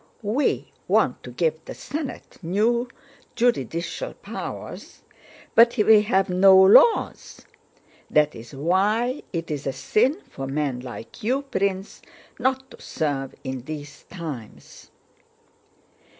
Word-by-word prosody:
"We 235 +7 0 0.2
want 195 - +2
to - - -10
give 160 +4 -1
the - - -8
Senate 285 +2 -6
new 220 +8 +1 0.5
juridical 230 - -1
powers, - - -8 0.5
but 235 +2 +6
we 215 0 +6
have 195 -3 +1
no 190 +1 +6
laws. 200 - +4 0.6
That 150 0 +3
is 115 +4 -11
why 205 - +1
it 165 -3 -4
is 145 -2 -4
a - - +1
sin 265 - +1
for 135 0 -7
men 140 -2 -2
like 125 -2 -9
you, 260 +6 0
Prince, 195 -6 -2 0.4
not 265 +1 -1
to - - -14
serve 140 -4 -3
in 130 -1 -5
these 145 -1 -8
times!" 155 - -9
190 Hz, 120 wpm, -24 LUFS, 145-235 Hz, 0.6 s, but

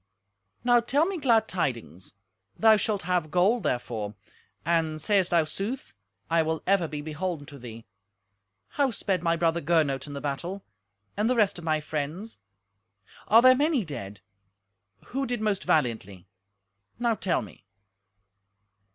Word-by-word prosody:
"Now 245 0 +5
tell 275 +7 +2
me 380 -1 -3
glad 230 -6 +3
tidings; 115 - -4 0.4
thou 220 -1 +6
shalt 205 -1 -1
have 180 -3 0
gold 190 +8 +3
therefor; 115 - -3 0.5
and, 160 -2 +1
sayest 195 +1 +2
thou 170 -2 +4
sooth, 195 - -5 0.3
I 165 0 +3
will 160 0 -2
ever 190 -3 +2
be 150 -1 -5
beholden 155 0 -4
to 140 0 -12
thee. 115 -2 -10 0.8
How 280 -2 +1
sped 195 -5 -1
my 170 -1 +2
brother 170 0 +1
Gernot 150 -4 +1
in 145 - -7
the 140 - -4
battle, 170 +8 -4 0.5
and 215 +3 +1
the 255 - +2
rest 210 -6 +2
of 170 - -10
my 155 -1 +1
friends? 155 +8 -5 0.9
Are 225 +2 +6
there 255 0 +9
many 285 - +1
dead? 105 - -7 0.9
Who 270 +1 -2
did 245 0 -2
most 210 -3 -1
valiantly? 110 - 0 0.7
Now 235 -1 +1
tell 195 -5 -1
me." 100 - -14
170 Hz, 145 wpm, -27 LUFS, 145-220 Hz, 0.9 s, there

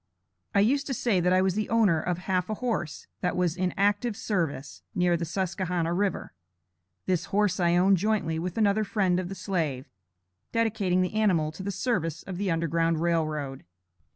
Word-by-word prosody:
I 200 - +6
used 275 +7 +2
to 265 - -2
say 220 -5 +1
that 180 +1 +2
I 185 0 +4
was 190 -1 +2
the 215 +1 -2
owner 210 -9 +3
of 175 +1 -1
half 180 +1 -1
a 215 - -1
horse 205 - -3
that 180 - -1
was 180 -2 +1
in 185 0 0
active 205 +3 +1
service, 160 -9 -2
near 180 -2 +3
the 170 0 -2
Susquehanna 180 -1 -1
River. 195 +2 -1 0.7
This 180 -3 0
horse 200 -2 +1
I 170 -1 +3
owned 190 +2 +4
jointly 180 -5 0
with 180 +3 -4
another 215 0 +3
friend 190 -4 +1
of 180 -1 -4
the 195 - -5
slave, 155 -10 -2 0.7
dedicating 205 -5 +1
the 180 - -3
animal 185 -8 +2
to 160 - -9
the 195 - -3
service 185 - -1
of 185 -2 -6
the 200 -1 0
Underground 165 0 +1
Rail 165 -1 +1
Road. 140 -3 -5
185 Hz, 185 wpm, -27 LUFS, 170-205 Hz, 0.7 s, I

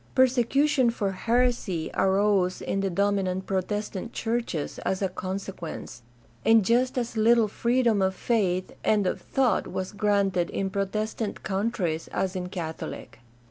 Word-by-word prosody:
Persecution 260 +1 +3
for 205 -4 -1
heresy 230 -5 0
arose 190 -1 +2
in 195 - -2
the 195 0 0
dominant 190 0 0
Protestant 205 +3 -3
churches 225 -9 -2
as 190 - -1
a 190 - +1
consequence, 185 -7 -6 0.4
and 225 -3 +5
just 250 +4 +2
as 240 -2 -2
little 225 0 +4
freedom 235 -1 +1
of 190 0 +1
faith 185 -6 0
and 210 -2 +2
of 180 - -1
thought 250 -7 +1
was 185 0 -4
granted 200 -4 +1
in 195 -1 -2
Protestant 210 +2 -2
countries 190 -5 -1
as 190 0 -2
n 180 -1 -3
Catholic. 165 -4 -6
200 Hz, 135 wpm, -26 LUFS, 185-230 Hz, 0.4 s, and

